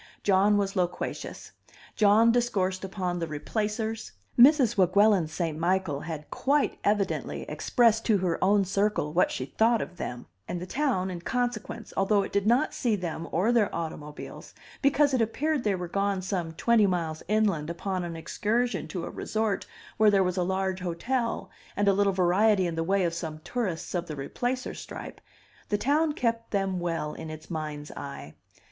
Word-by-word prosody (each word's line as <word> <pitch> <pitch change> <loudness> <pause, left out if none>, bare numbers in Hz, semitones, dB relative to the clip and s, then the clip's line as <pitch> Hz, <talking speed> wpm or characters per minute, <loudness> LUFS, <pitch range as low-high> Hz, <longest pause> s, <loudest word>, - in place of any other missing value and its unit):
John 200 +1 +4
was 200 -1 -1
loquacious; 180 -2 -3 0.4
John 215 +2 +5
discoursed 195 -6 0
upon 185 -2 -3
the 165 - -2
Replacers; 215 - -3 0.2
Mrs. 255 -2 +6
Weguelin 195 -1 +4
St. 160 0 -3
Michael 170 -2 0
had 155 -1 -7
quite 285 +2 +1
evidently 205 -2 0
expressed 230 -3 +2
to 215 -3 +4
her 180 -2 -1
own 200 +1 +4
circle 195 -5 0
what 180 - +3
she 130 - -3
thought 225 - +2
of 180 - -6
them; 125 -4 -5 0.2
and 175 - -3
the 180 - -5
town 190 -6 0
in 175 -1 -6
consequence, 245 +1 -3
although 200 +1 +3
it - - -6
did 200 +1 +1
not 245 +6 +3
see 235 -5 +1
them 170 -3 -4
or 195 +8 +2
their 230 -4 +3
automobiles, 155 -3 -7 0.3
because 285 0 +3
it 255 - +3
appeared 280 +5 0
they 205 -2 +1
were 180 -1 -4
gone 195 +1 -1
some 180 -4 -2
twenty 220 +4 +3
miles 165 -4 -2
inland 200 -7 +1
upon 185 +2 -3
an 170 -1 -5
excursion 230 +9 -1
to 175 -3 -4
a - - -5
resort 215 -3 -2 0.3
where 205 -3 +5
was 180 -1 -1
a 185 - 0
large 190 +1 -1
hotel, 230 +8 -2 0.3
and 205 0 +2
a 200 - +6
little 200 0 +3
variety 190 +2 +3
in 170 - -2
the 165 0 -1
way 195 +2 +1
of 170 -1 0
some 160 -2 -5
tourists 205 -10 -3
of 175 -1 -2
the 155 - -5
Replacer 245 - -3
stripe, - - -8 0.5
the 205 - +2
town 300 +7 +2
kept 230 -3 -1
them 195 -2 -1
well 165 -3 -2
in 160 - -7
its 155 +2 -9
mind's 150 -2 -5
eye. 75 - -8
195 Hz, 175 wpm, -27 LUFS, 170-220 Hz, 0.5 s, Mrs